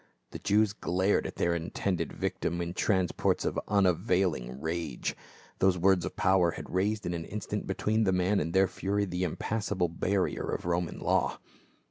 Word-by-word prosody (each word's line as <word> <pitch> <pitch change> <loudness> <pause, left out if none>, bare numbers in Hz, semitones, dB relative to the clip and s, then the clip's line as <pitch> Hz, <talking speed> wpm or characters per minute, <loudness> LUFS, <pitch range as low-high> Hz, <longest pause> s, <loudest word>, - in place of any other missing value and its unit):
The - - -6
Jews 105 0 +2
glared 95 0 +1
at - - -8
their 85 - +1
intended 85 +2 -2
victim 85 - -2
in 85 0 -3
transports 95 -2 +1
of - - 0
unavailing 90 - +1
rage, 80 -4 -3 0.4
those 95 -1 +4
words 90 -1 +3
of - - -5
power 95 -3 +3
had - - -7
raised 105 +3 0
in 85 - -1
an 85 -1 -4
instant 105 0 -4
between 110 +1 +1
the 95 - +3
man 90 +2 +2
and 80 +2 -2
their 95 +2 +4
fury 100 +3 -1
the 90 -1 -2
impassable 95 0 -1
barrier 95 +3 -1
of - - -3
Roman 85 -1 -1
law. - - +1
90 Hz, 165 wpm, -29 LUFS, 85-100 Hz, 0.4 s, those